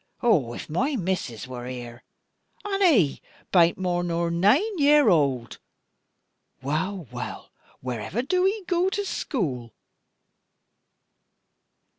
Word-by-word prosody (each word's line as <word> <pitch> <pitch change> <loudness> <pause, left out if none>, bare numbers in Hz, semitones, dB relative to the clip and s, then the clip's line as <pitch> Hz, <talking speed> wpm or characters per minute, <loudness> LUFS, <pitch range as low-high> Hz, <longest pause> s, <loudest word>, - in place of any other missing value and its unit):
Oh, 145 - +3
if - - -7
my 260 - 0
missus 180 - -3
wor 125 -1 -7
here! 120 -1 -8 0.6
And 400 -1 -2
'e 225 - +4 0.3
bain't 170 -2 +4
more 180 -2 -1
nor 170 -1 -1
naine 265 - +2
year 290 -3 +5
old! 135 - +1 1.0
Wull, 170 +7 -2
wull, 125 0 -7 0.3
where 125 -3 -4
ever 205 - -3
do 365 +6 +2
'e 410 +1 -2
goo 355 +1 +1
to 405 +1 -2
schoüll?" 140 - -3
175 Hz, 115 wpm, -25 LUFS, -, 1.0 s, year